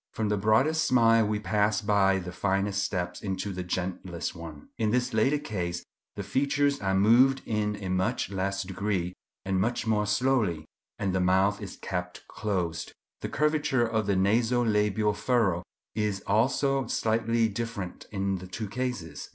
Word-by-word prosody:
From 110 Hz, -2 st, -1 dB
the 105 Hz, -, +2 dB
broadest 135 Hz, +10 st, +3 dB
smile 115 Hz, -3 st, +4 dB
we 105 Hz, 0 st, 0 dB
pass 105 Hz, 0 st, +1 dB
by 100 Hz, -2 st, +3 dB
the 90 Hz, -1 st, -5 dB
finest 100 Hz, +1 st, 0 dB
steps 90 Hz, -3 st, -3 dB
into 95 Hz, 0 st, -3 dB
the 90 Hz, -, -4 dB
gentlest 90 Hz, -1 st, -3 dB
one. 80 Hz, -3 st, -10 dB
In 110 Hz, -1 st, +2 dB
this 125 Hz, +2 st, 0 dB
latter 135 Hz, +7 st, +3 dB
case 90 Hz, -, -4 dB, 0.3 s
the -, -, -4 dB
features 140 Hz, +1 st, +1 dB
are 95 Hz, -1 st, +1 dB
moved 125 Hz, +7 st, +5 dB
in 105 Hz, -1 st, -1 dB
a -, -, -3 dB
much 95 Hz, +1 st, 0 dB
less 100 Hz, 0 st, -1 dB
degree, 95 Hz, -1 st, -2 dB, 0.3 s
and 95 Hz, -1 st, +1 dB
much 120 Hz, +3 st, -1 dB
more 105 Hz, -2 st, +1 dB
slowly, 105 Hz, -, +1 dB, 0.3 s
and 95 Hz, -2 st, -1 dB
the 95 Hz, -, +1 dB
mouth 95 Hz, +3 st, +2 dB
is 100 Hz, -, -7 dB
kept 90 Hz, -1 st, -5 dB
closed. 90 Hz, -6 st, -3 dB, 0.3 s
The -, -, -4 dB
curvature 150 Hz, -5 st, +1 dB
of 110 Hz, -2 st, -1 dB
the 100 Hz, -, +2 dB
naso 115 Hz, +6 st, +2 dB
labial 105 Hz, -1 st, +2 dB
furrow 105 Hz, -6 st, +1 dB, 0.3 s
is 105 Hz, -3 st, -1 dB
also 135 Hz, +5 st, +2 dB
slightly 115 Hz, 0 st, +1 dB
different 105 Hz, -4 st, -5 dB
in 95 Hz, -1 st, -1 dB
the 95 Hz, -, -9 dB
two 105 Hz, +3 st, -5 dB
cases. 120 Hz, -, -4 dB
105 Hz, 160 wpm, -28 LUFS, 95-115 Hz, 0.3 s, moved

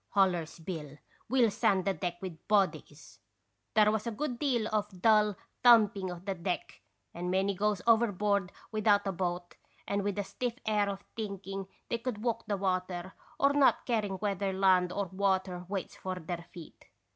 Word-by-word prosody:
hollers 180 Hz, -5 st, +2 dB
Bill. 155 Hz, -5 st, -6 dB, 0.3 s
We 260 Hz, 0 st, +3 dB
'11 230 Hz, -3 st, +5 dB
sand 200 Hz, -4 st, +2 dB
the 195 Hz, -, +2 dB
deck 175 Hz, +1 st, -3 dB
with 170 Hz, -4 st, -8 dB
bodies! 200 Hz, -3 st, 0 dB
' -, -, -49 dB
' -, -, -49 dB
' -, -, -49 dB
There 210 Hz, -1 st, +6 dB
was 220 Hz, +1 st, -2 dB
a -, -, -1 dB
good 245 Hz, +1 st, -3 dB
deal 245 Hz, -7 st, +1 dB
of 210 Hz, -3 st, -1 dB
dull 210 Hz, 0 st, +4 dB, 0.3 s
thumping 210 Hz, -5 st, +6 dB
of 175 Hz, +1 st, -8 dB
the 195 Hz, -, -1 dB
deck, 175 Hz, -, -4 dB, 0.3 s
and 175 Hz, +1 st, -4 dB
many 190 Hz, +2 st, +1 dB
goes 205 Hz, 0 st, 0 dB
overboard 205 Hz, -4 st, +2 dB, 0.2 s
without 210 Hz, -2 st, +3 dB
a 195 Hz, -, 0 dB
boat 175 Hz, -1 st, -3 dB, 0.3 s
and 200 Hz, 0 st, 0 dB
with 200 Hz, 0 st, -2 dB
a 205 Hz, -, 0 dB
stiff 240 Hz, +4 st, -3 dB
air 210 Hz, -2 st, +2 dB
of 200 Hz, 0 st, -5 dB
thinking 195 Hz, -3 st, -5 dB, 0.2 s
they 235 Hz, -, -1 dB
could 230 Hz, -3 st, -4 dB
walk 230 Hz, -2 st, -1 dB
the 205 Hz, -2 st, 0 dB
water, 185 Hz, -1 st, -2 dB, 0.3 s
or 280 Hz, 0 st, +4 dB
not 285 Hz, -2 st, +4 dB
caring 215 Hz, -5 st, 0 dB
whether 200 Hz, -1 st, -1 dB
land 185 Hz, -2 st, +3 dB
or 200 Hz, +2 st, -1 dB
water 185 Hz, -1 st, -1 dB
waits 195 Hz, -2 st, -4 dB
for 185 Hz, 0 st, -4 dB
their 170 Hz, -1 st, -6 dB
feet. 170 Hz, -3 st, -12 dB
195 Hz, 185 wpm, -31 LUFS, 185-215 Hz, 0.3 s, There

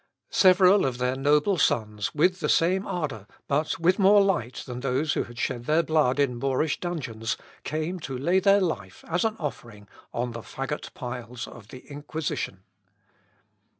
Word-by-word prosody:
Several 185 Hz, +1 st, +6 dB
of 125 Hz, -2 st, -3 dB
their 125 Hz, +1 st, 0 dB
noble 150 Hz, +7 st, +2 dB
sons 105 Hz, -5 st, 0 dB
with 180 Hz, +4 st, +3 dB
the -, -, -1 dB
same 185 Hz, +4 st, +2 dB
ardour, 150 Hz, -, -4 dB, 0.2 s
but 150 Hz, +3 st, 0 dB
with 180 Hz, +4 st, +3 dB
more 200 Hz, +1 st, +6 dB
light 175 Hz, -, 0 dB
than 125 Hz, -1 st, -6 dB
those 135 Hz, +4 st, 0 dB
who -, -, -1 dB
had 120 Hz, 0 st, -13 dB
shed 120 Hz, -1 st, -2 dB
their 155 Hz, +4 st, +3 dB
blood 150 Hz, -5 st, +2 dB
in 125 Hz, -4 st, +1 dB
Moorish 135 Hz, +3 st, 0 dB
dungeons, 125 Hz, -11 st, -3 dB, 0.3 s
came 155 Hz, +5 st, -3 dB
to 135 Hz, -5 st, -5 dB
lay 175 Hz, +8 st, +2 dB
their 200 Hz, +1 st, +4 dB
life, 175 Hz, -4 st, -3 dB
as 175 Hz, +2 st, 0 dB
an 220 Hz, -1 st, 0 dB
offering, 115 Hz, -8 st, -7 dB, 0.2 s
on 120 Hz, +1 st, -2 dB
the 115 Hz, 0 st, -7 dB
faggot 135 Hz, +6 st, -5 dB
piles 125 Hz, -1 st, -6 dB
of 110 Hz, -4 st, -13 dB
the 125 Hz, +3 st, -12 dB
Inquisition. 145 Hz, -, -4 dB
145 Hz, 165 wpm, -26 LUFS, 125-175 Hz, 0.3 s, Several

